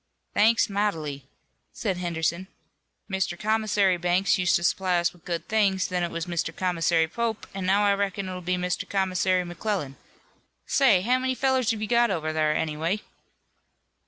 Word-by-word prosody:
"Thanks 225 +2 +4
mightily," 160 -10 -2 0.5
said 195 -5 -2
Henderson. 170 +1 -2 0.6
"Mr. 190 -3 -2
Commissary 210 -3 +1
Banks 180 +3 +1
used 180 -1 +3
to 170 - 0
supply 185 0 +1
us 170 0 +1
with 175 -2 -22
good 170 -2 -4
things, 200 -4 +1
then 180 -1 -1
it 175 - -1
was 170 0 -4
Mr. 170 -2 -3
Commissary 170 -3 +1
Pope, 225 +4 -3
and 190 -1 -4
now 200 +2 +3
I 200 - +4
reckon 200 -1 -2
it'll 185 -1 -5
be 180 +1 -1
Mr. 180 -1 -2
Commissary 185 -1 +1
McClellan. 175 -5 -3 0.7
Say, 235 -10 +4
how 250 +6 +2
many 260 0 -1
fellers 260 -2 +1
have 220 -2 -1
you - - -2
got 240 +1 +3
over 155 -4 -2
thar, 155 -1 +2
anyway?" 160 +6 -1
185 Hz, 165 wpm, -26 LUFS, 170-205 Hz, 0.7 s, Thanks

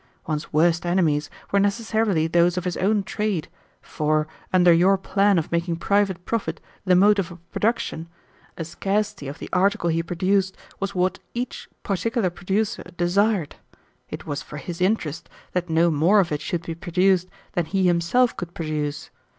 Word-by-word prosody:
One's 150 -2 -3
worst 165 +2 +3
enemies 165 -5 +1 0.2
were 200 - +3
necessarily 205 -4 +1
those 170 +2 +3
of 180 - -1
his 180 -1 -2
own 205 +1 +1
trade, 205 -5 -2 0.3
for, 155 0 0 0.2
under 180 -2 +6
your 185 +4 +4
plan 195 +1 +2
of 160 - -1
making 170 0 0
private 190 0 0
profit 175 -8 -2 0.3
the 185 -1 +4
motive 195 -1 +4
of 170 0 -15
production, 210 -7 -1 0.5
a 165 - -4
scarcity 195 0 -2
of 140 +3 -6
the - - -7
article 185 -2 +2
he 165 +1 +1
produced 190 +3 0 0.2
was 195 0 -3
what 185 +1 +1 0.2
each 245 0 -4
particular 205 0 0
producer 195 +5 -1 0.2
desired. 185 0 +1 0.5
It - - -7
was 145 - -3
for 150 - -9
his 170 +4 -6
interest 180 -6 0 0.2
that 180 -1 -2
no 165 +1 +3
more 165 +8 +4
of 175 -4 +1
it 150 - -1
should 170 -1 -3
be 165 - -4
produced 180 +2 +1 0.2
than 175 - 0
he 190 +3 0
himself 180 +8 +3
could 175 -1 -7
produce. 150 -2 -3
180 Hz, 165 wpm, -23 LUFS, 165-200 Hz, 0.5 s, under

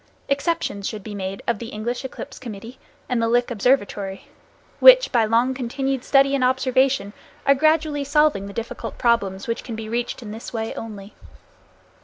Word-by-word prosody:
Exceptions 280 - -1
should 215 -3 -7
be 215 - -7
made 195 -1 -5
of 235 -4 0
the 235 - -6
English 235 +3 -4
Eclipse 265 - -8
Committee 230 +1 -9 0.3
and 245 -2 0
the 230 - +2
Lick 240 +1 +2
Observatory, 205 -4 0 0.5
which, - - +8
by 235 -3 +3
long 235 +4 +2
continued 265 +1 -2
study 275 0 +4
and 275 -2 +1
observation, 260 -4 +2 0.3
are 275 - +6
gradually 310 0 +2
solving 285 -8 +2
the - - -7
difficult 230 +2 -6
problems 200 -5 +1
which 230 - -2
can 230 - -6
be 220 0 -6
reached 240 +2 -3
in 210 - -7
this 225 +2 -8
way 225 -1 -3
only. 210 -2 -8
240 Hz, 170 wpm, -22 LUFS, 215-270 Hz, 0.5 s, which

